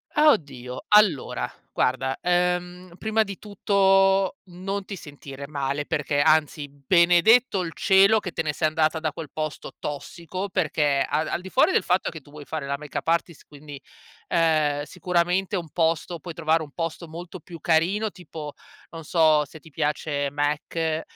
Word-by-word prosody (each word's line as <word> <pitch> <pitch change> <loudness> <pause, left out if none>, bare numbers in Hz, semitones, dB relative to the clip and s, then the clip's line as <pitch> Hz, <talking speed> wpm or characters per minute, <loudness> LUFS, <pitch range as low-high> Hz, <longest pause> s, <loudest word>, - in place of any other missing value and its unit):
Ah, 300 0 +6
oddio. 130 - -4
Allora, 210 -9 +3 0.2
guarda, 130 +1 0
uhm, 180 0 -1
prima 220 0 +1
di 200 -2 -8
tutto, 195 -2 +2
non 190 +2 -5
ti 200 - -6
sentire 140 -3 -10
male 140 0 -2
perché, 150 -3 0
anzi, 150 -1 +2
benedetto 175 - +4
il 165 -2 -4
cielo 195 +3 +5
che 185 - -5
te 165 - -2
ne 150 -1 -1
sei 155 - +1
andata 155 +1 +1
da 155 -1 -2
quel 160 +1 -8
posto 155 -1 -5
tossico 170 +6 -5
perché 150 -6 +1
al 155 +2 0
al - - -2
di 190 - -9
fuori 305 - +4
del - - +3
fatto 180 +1 +1
che 160 - -8
tu 145 - -20
vuoi 145 -1 -11
fare 150 -3 -5
la 140 0 -2
makeup 150 +2 -6
artist, 170 -1 -1
quindi, 145 -1 -11 0.5
ehm, 155 -3 +2
sicuramente 180 +3 0
un 170 -3 -4
posto 165 0 0
puoi 170 +2 -8
trovare, 160 0 +1
un 150 -2 -8
posto 165 0 -4
molto 175 +3 -9
più 170 +1 -11
carino 180 +8 +1
tipo, 160 -5 -9 0.4
non 165 -1 -8
so, 155 -1 +4
se 160 +3 -13
ti 160 +1 -17
piace 145 -1 -1
M·A·C, 155 +2 -1
165 Hz, 165 wpm, -24 LUFS, 150-185 Hz, 0.5 s, Ah